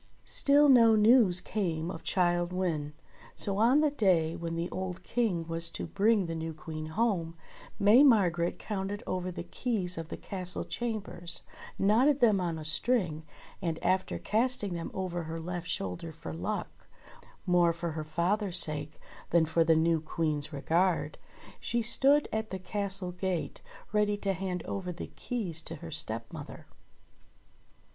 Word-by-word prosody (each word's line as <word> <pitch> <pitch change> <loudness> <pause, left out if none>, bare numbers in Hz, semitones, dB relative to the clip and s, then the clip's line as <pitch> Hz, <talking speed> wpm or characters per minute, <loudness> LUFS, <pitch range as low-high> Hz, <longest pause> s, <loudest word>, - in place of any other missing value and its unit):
Still 285 +1 +5
no 230 -5 +6
news 215 -4 +5
came 170 -5 -2
of 165 - -8
Childe 175 -1 0
Wynde; 165 -5 -2 0.4
so 200 -1 -1
on 250 +7 +4
the 305 -2 +2
day 180 - +2
when 170 -1 -5
the 170 +1 -2
old 185 -1 -5
King 190 -9 -1
was 165 0 +1
to - - -6
bring 205 0 +2
the 165 - -4
new 160 -1 -5
Queen 155 0 -7
home, 170 -3 -1 0.4
May 210 +6 +6
Mar 220 -11 +5
gret 170 0 -2
counted 200 -1 -4
over 185 0 -3
the 170 - -6
keys 180 -2 -1
of 165 - -6
the - - -6
castle 180 -2 0
chambers, 210 -7 -3 0.3
knotted 245 +9 +3
them 215 -6 +4
on 170 -2 -2
a 155 - -7
string, 160 -1 +2 0.4
and 165 -4 -2
after 185 0 0
casting 220 -3 +1
them 170 -1 -4
over 180 -2 -3
her 165 +1 -5
left 175 +1 -5
shoulder 95 - -3
for 155 - -8
luck 85 +3 -5 0.3
— - - -19 0.3
more 175 -1 +4
for 170 0 -4
her 155 0 -4
father's 175 +5 0
sake 150 -3 +1 0.3
than 170 -1 +3
for 165 +1 +2
the 165 0 +4
new 165 0 +2
Queen's 155 -1 -2
regard 170 +5 0 0.2
— - - -18
she 235 -1 -1
stood 275 +6 +4
at 220 0 -2
the 190 - -4
Castle 195 -1 -1
gate 180 -1 -3 0.3
ready 210 -1 +2
to 195 -1 -1
hand 185 -1 -4
over 185 -2 -4
the 175 - -8
keys 185 -10 -2
to 165 - -8
her 165 +1 -9
stepmother. 115 -5 -4
180 Hz, 165 wpm, -29 LUFS, 165-210 Hz, 0.4 s, no